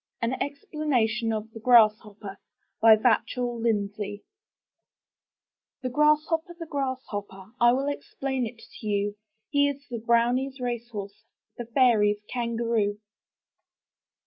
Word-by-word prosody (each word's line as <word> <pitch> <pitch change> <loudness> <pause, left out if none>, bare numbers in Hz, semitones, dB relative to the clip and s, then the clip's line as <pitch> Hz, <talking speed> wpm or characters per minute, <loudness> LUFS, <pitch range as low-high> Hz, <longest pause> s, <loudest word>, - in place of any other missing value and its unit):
AN 230 +2 -1
EXPLANATION 265 -6 -1
OF 220 0 -4
THE 225 - -10
GRASSHOPPER* 215 -4 +3 0.4
Vachell 230 +2 +3
Lindsay 205 -2 -2 1.6
The 255 - -1
Grasshopper, 305 +4 +2
the 335 - -6
Grasshopper, 240 -9 -5
I 240 0 +7
will 270 +2 0
explain 265 -4 -3
to 225 - -11
you: 205 0 0 0.2
— 220 - -53
He 285 0 +3
is 280 0 -7
the 235 - -3
Brownies' 240 +4 +1
racehorse. 225 -4 -5 0.4
The 240 - -4
fairies* 225 -4 +3
Kangaroo! 230 -3 -1
235 Hz, 105 wpm, -26 LUFS, 215-265 Hz, 1.6 s, I